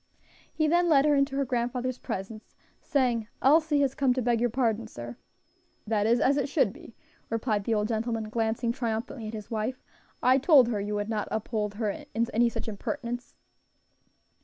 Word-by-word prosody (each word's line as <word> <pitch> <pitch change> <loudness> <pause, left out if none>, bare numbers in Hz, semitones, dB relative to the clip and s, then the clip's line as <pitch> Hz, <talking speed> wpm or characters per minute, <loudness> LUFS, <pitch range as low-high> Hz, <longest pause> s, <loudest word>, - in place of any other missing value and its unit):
He 310 -1 +1
then 345 +2 +3
led 285 -3 +5
her 300 - +4
into 275 0 +1
her 275 0 +1
grandfather's 250 +1 -2
presence, 215 +3 -6 0.3
saying: 245 -6 0
"Elsie 300 +1 +4
has 270 -2 +1
come 265 -3 +2
to 260 - 0
beg 235 -1 +1
your 245 - +2
pardon, 230 -2 0
sir." 120 - -8 0.7
"That 215 -1 +1
is 235 +1 +3
as 280 +3 +3
it 280 -1 0
should 265 -9 +2
be," 230 - -14 0.3
replied 220 -3 -1
the 230 - +1
old 210 0 +1
gentleman, 225 -1 -2
glancing 225 +1 0
triumphantly 230 -1 -3
at 220 - -6
his 210 0 -9
wife; 225 +4 -2 0.4
"I 260 +2 +5
told 270 -4 +6
her 210 -4 -1
you 205 +1 -3
would 205 0 -2
not 215 -2 -2
uphold 215 -1 -2
her 215 -1 -1
in 230 +3 -3
any 235 +2 +4
such 230 -1 -6
impertinence." 240 +3 -5
235 Hz, 185 wpm, -28 LUFS, 220-265 Hz, 0.7 s, told